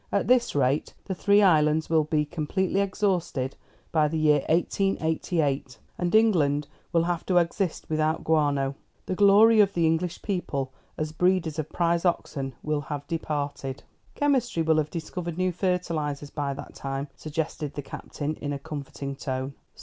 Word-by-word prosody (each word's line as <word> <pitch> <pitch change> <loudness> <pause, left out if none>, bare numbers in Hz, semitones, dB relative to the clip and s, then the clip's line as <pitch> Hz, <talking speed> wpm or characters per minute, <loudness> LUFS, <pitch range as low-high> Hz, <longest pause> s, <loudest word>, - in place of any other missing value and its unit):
At 200 - +1
this 245 -6 +3
rate 140 +1 +1
the 190 - -2
three 200 +3 +4
islands 155 -3 +4
will 160 -2 +3
be 150 -1 +1
completely 175 +5 -1
exhausted 185 -9 -1 0.4
by 155 -2 +3
the 160 +2 -2
year 150 -1 +4
1888, 160 - 0 0.2
and 175 +3 0
England 150 -10 +3 0.2
will 165 -1 +3
have 175 -1 -1
to 180 - +3
exist 175 +1 0
without 155 0 0
guano. 145 -3 +2 0.3
The - - -2
glory 205 +3 +6
of 200 -1 +2
the 170 -1 +3
English 165 +2 0
people, 140 -9 -2 0.3
as 155 0 -2
breeders 175 -2 +1
of 155 - -3
prize 170 -1 +1
oxen, 135 -7 -1
will 150 -1 0
have 145 0 -5
departed." 145 -4 -3 0.3
"Chemistry 255 - +1
will 160 0 +3
have 150 0 -1
discovered 170 +1 -5
new 185 0 +1
fertilisers 165 -6 -2
by 140 -2 -2
that 145 - -9
time," 135 +1 -4
suggested 155 -1 -4
the 145 - -4
Captain, 145 +2 -5
in 145 - -4
a - - -2
comforting 140 -2 -6
tone. 130 0 -3
160 Hz, 155 wpm, -26 LUFS, 145-180 Hz, 0.4 s, glory